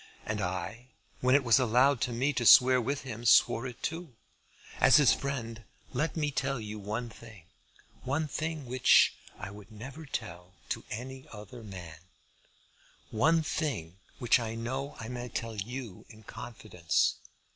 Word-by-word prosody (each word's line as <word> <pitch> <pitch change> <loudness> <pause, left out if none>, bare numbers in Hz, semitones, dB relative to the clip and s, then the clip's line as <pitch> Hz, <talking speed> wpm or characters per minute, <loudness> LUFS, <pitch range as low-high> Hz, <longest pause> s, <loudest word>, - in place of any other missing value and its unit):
And 105 -1 -2
I, 95 +6 -4 0.3
when 130 +1 +3
it 140 - +4
was 120 +1 +5
allowed 125 +2 +3
to 125 - 0
me 130 +5 0
to 125 - -1
swear 125 +2 +7
with 140 +4 -2
him, 120 -3 -7
swore 120 +1 +4
it 125 - -10
too. 165 -5 -4 0.6
As 130 - +6
his 145 -6 +6
friend, 115 -5 -4 0.3
let 150 +6 -1
me 150 -2 0
tell 135 -1 -1
you 105 -1 -6
one 110 +4 -4
thing, 115 -5 -13 0.6
one 145 +4 -1
thing 155 0 -4
which 125 +1 +5 0.2
I 95 - -7
would 105 +1 -13
never 135 +8 -9
tell 90 -7 -6
to - - -3
any 130 +3 -7
other 110 +3 -10
man, 90 -7 -9 1.1
one 160 +8 +3
thing 95 - -3 0.2
which 120 +1 +3
I 115 -1 -4
know 130 +5 -4
I 110 - -6
may 125 0 -5
tell 115 -1 -4
you 115 0 -6
in 110 -2 -15
confidence. 105 -7 -1
120 Hz, 155 wpm, -30 LUFS, 110-135 Hz, 1.1 s, swear